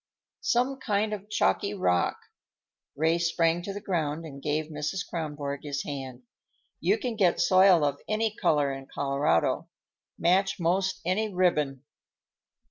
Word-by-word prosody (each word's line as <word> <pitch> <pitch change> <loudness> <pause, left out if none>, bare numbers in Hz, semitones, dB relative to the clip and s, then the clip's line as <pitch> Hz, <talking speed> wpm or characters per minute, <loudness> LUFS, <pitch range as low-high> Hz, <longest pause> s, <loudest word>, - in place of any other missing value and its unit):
"Some 255 +3 +1
kind 215 -3 0
of 205 0 -7
chalky 205 -1 +1
rock." 90 - +1 0.8
Ray 160 +3 +2
sprang 170 0 +1
to 195 - -5
the 200 - -5
ground 165 -5 -2
and 140 -3 -9
gave 150 +2 -1
Mrs. 155 +5 -3
Kronborg 145 -4 -4
his 145 -1 -3
hand. 130 -3 -6 0.6
"You 195 +6 +2
can 245 -2 -3
get 185 -5 +2
soil 185 -3 +5
of 145 0 -2
any 215 0 0
color 145 -8 +2
in 135 0 -8
Colorado; 140 - 0 0.5
match 195 +3 +2
most 185 +3 0
any 210 +4 0
ribbon." 150 -8 +1
170 Hz, 135 wpm, -27 LUFS, 145-195 Hz, 0.8 s, soil